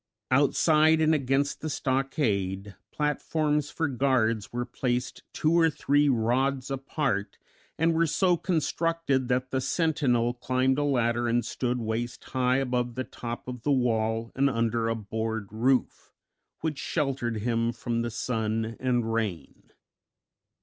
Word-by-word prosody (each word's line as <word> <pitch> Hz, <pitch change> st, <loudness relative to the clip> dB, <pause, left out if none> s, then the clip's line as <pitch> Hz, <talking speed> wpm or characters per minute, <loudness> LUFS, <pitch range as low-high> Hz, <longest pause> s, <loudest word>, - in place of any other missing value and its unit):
Outside 155 Hz, +3 st, +4 dB
and 160 Hz, 0 st, +4 dB
against 140 Hz, -1 st, 0 dB
the 155 Hz, -, -3 dB
stockade 110 Hz, -, -1 dB, 0.2 s
platforms 150 Hz, 0 st, 0 dB
for 160 Hz, -, -1 dB
guards 120 Hz, -6 st, +1 dB
were 120 Hz, 0 st, -2 dB
placed 125 Hz, 0 st, -2 dB
two 155 Hz, +1 st, +1 dB
or 165 Hz, -1 st, +5 dB
three 145 Hz, -1 st, +2 dB
rods 130 Hz, +3 st, +1 dB
apart, 135 Hz, -7 st, -2 dB, 0.4 s
and 165 Hz, +1 st, +2 dB
were 165 Hz, +1 st, +2 dB
so 180 Hz, +3 st, +3 dB
constructed 165 Hz, -5 st, 0 dB
that 130 Hz, +1 st, 0 dB
the 130 Hz, -, 0 dB
sentinel 130 Hz, -5 st, +1 dB
climbed 130 Hz, +2 st, +1 dB
a -, -, +1 dB
ladder 120 Hz, -4 st, +1 dB
and 120 Hz, 0 st, +1 dB
stood 125 Hz, +1 st, -2 dB
waist 115 Hz, +1 st, -3 dB
high 130 Hz, 0 st, +1 dB
above 125 Hz, -2 st, -1 dB
the 130 Hz, -, -2 dB
top 120 Hz, -1 st, -7 dB
of 125 Hz, -2 st, -6 dB
the 145 Hz, -, 0 dB
wall 115 Hz, -3 st, +1 dB
and 140 Hz, +1 st, +2 dB
under 115 Hz, -1 st, 0 dB
a 115 Hz, -, 0 dB
board 110 Hz, -1 st, -4 dB
roof, 125 Hz, +4 st, 0 dB, 0.5 s
which 155 Hz, -3 st, -2 dB
sheltered 135 Hz, -7 st, -1 dB
him 115 Hz, 0 st, 0 dB
from 115 Hz, 0 st, -2 dB
the 120 Hz, -, -2 dB
sun 110 Hz, -1 st, -2 dB
and 120 Hz, -3 st, 0 dB
rain. 105 Hz, -7 st, -4 dB
125 Hz, 140 wpm, -27 LUFS, 115-145 Hz, 0.5 s, or